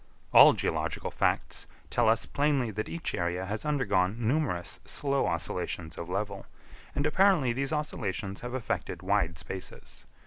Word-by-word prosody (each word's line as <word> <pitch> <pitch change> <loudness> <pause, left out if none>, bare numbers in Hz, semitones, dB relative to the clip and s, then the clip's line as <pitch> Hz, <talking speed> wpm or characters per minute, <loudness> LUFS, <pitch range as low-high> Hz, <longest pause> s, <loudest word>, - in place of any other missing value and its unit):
All - - +10
geological - - -2
facts - - 0 0.2
tell - - +3
us 115 - +2
plainly 140 -5 +1
that 110 +1 -4
each 170 0 -4
area 90 +2 -1
has 105 +6 -4
undergone 110 -10 +1
numerous 115 - 0
slow 140 -1 0
oscillations 85 -1 -3
of 85 - -6
level, 100 +1 -3 0.5
and 145 - 0
apparently 160 -6 +4
these 135 +3 -1
oscillations 105 -10 -3
have 120 +1 -5
affected 130 - -3
wide 80 -1 +1
spaces. 95 +4 -8
110 Hz, 140 wpm, -29 LUFS, 90-140 Hz, 0.5 s, All